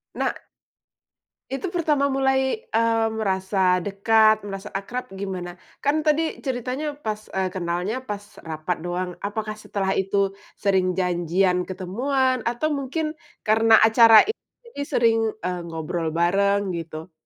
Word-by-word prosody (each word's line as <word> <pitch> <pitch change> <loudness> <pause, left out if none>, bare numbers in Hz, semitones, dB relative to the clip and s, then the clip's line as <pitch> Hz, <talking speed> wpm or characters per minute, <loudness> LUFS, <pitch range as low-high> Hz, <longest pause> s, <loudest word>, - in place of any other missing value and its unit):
Nah - - 0 1.2
Itu 275 +8 -3
pertama 305 -5 +1
mulai, 265 - +1
eee, 225 0 +2
merasa 190 -3 +1
dekat, 215 +3 +3
merasa 195 -1 -7
akrab, 235 +6 -4
gimana? 185 -2 -6 0.2
Kan, 295 +2 +1
tadi 310 +1 0
ceritanya 265 +3 -3
pas, 215 -6 -5
eee, 185 -1 -1
kenalnya 180 +6 -2
pas 210 -5 -6 0.3
rapat 160 +3 -2
doang, 180 +1 -3
apakah 215 +1 -3
setelah 200 -2 -2
itu 195 0 0 0.2
sering 190 -3 +1
janjian 180 0 +1
ketemuan, 255 +8 0
atau 300 +6 -1
mungkin 300 +3 -2 0.3
karena 220 0 +5
acara 225 0 +7
ini 440 - -1 0.4
jadi 285 - -5
sering, 230 -1 +3 0.3
eee, 180 -1 -2
ngobrol 165 +1 -3
bareng, 195 +4 +1
gitu? 165 0 -6
205 Hz, 125 wpm, -24 LUFS, 185-255 Hz, 1.2 s, acara